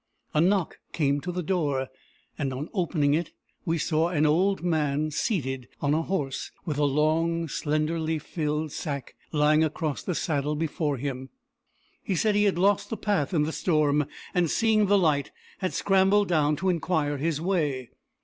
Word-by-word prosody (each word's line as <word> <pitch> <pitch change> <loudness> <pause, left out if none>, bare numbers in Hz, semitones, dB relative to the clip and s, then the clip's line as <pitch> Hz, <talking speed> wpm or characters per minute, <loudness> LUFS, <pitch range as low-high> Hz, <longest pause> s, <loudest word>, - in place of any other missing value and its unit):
A 150 - +3
knock 185 0 +1
came 145 -2 +1
to 180 +4 -4
the 180 0 -3
door, 145 -7 0 0.5
and, 135 -3 -2
on 140 +5 -5
opening 160 -6 +1
it, 165 +1 -1 0.3
we 165 0 +1
saw 160 +1 +1
an 155 -3 +2
old 180 +5 +2
man 155 -3 0
seated 135 - -2
on 145 0 +1
a 160 - +2
horse, 160 -7 -2 0.2
with 150 -3 -2
a 145 - +3
long 160 +4 +1
slenderly 155 +2 -1
filled 150 0 -3
sack 140 -5 -5 0.2
lying 150 +1 +4
across 155 -1 -2
the 180 - -3
saddle 150 -2 -1
before 150 -2 -1
him. 130 0 -4 0.7
He 190 - -2
said 215 +4 +2
he 205 0 +3
had 195 -4 +2
lost 195 +2 +2
the 225 - -3
path 200 -9 0
in 160 -5 +2
the 155 - -1
storm, 150 -4 +2 0.3
and, 175 -2 +2
seeing 215 0 +3
the 205 +1 +5
light, 150 -7 +2 0.3
had 185 - -1
scrambled 195 +1 +3
down 150 -3 +3
to 190 +4 -1
inquire 160 -4 0
his 155 +1 -1
way. 150 -8 -1
155 Hz, 170 wpm, -27 LUFS, 145-180 Hz, 0.7 s, the